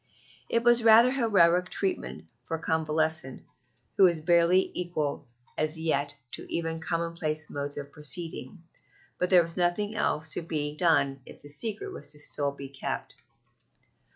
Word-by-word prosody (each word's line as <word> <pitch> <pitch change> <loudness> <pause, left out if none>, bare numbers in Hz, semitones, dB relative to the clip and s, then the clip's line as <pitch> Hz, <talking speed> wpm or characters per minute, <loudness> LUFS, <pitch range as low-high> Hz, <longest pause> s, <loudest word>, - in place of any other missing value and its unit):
It 230 - +1
was 240 -1 +5
rather 230 +2 +7
heroic 180 -9 +3
treatment 80 - -3 0.2
for 165 - -2
a - - -13
convalescent, 160 -3 -1 0.5
who 195 - +7
was 170 -3 +3
barely 170 +3 +3
equal 165 -7 -3 0.3
as 155 +1 -1
yet 145 -3 0 0.2
to - - -7
even 165 -1 -2
commonplace 165 -2 -3
modes 145 0 -4
of 140 -1 -6
proceeding, 165 +4 -4 0.6
but 180 - 0
there 180 -2 +6
was 165 0 -7
nothing 180 +4 0
else 160 -7 -1
to - - -2
be 150 -3 -2
done 150 -5 +2
if - - -14
the 145 - -11
secret 205 +9 0
was 145 - -9 0.2
still 145 -1 0
to 140 - -17
be 140 - -7
kept. 135 0 -5
165 Hz, 155 wpm, -28 LUFS, 150-180 Hz, 0.6 s, rather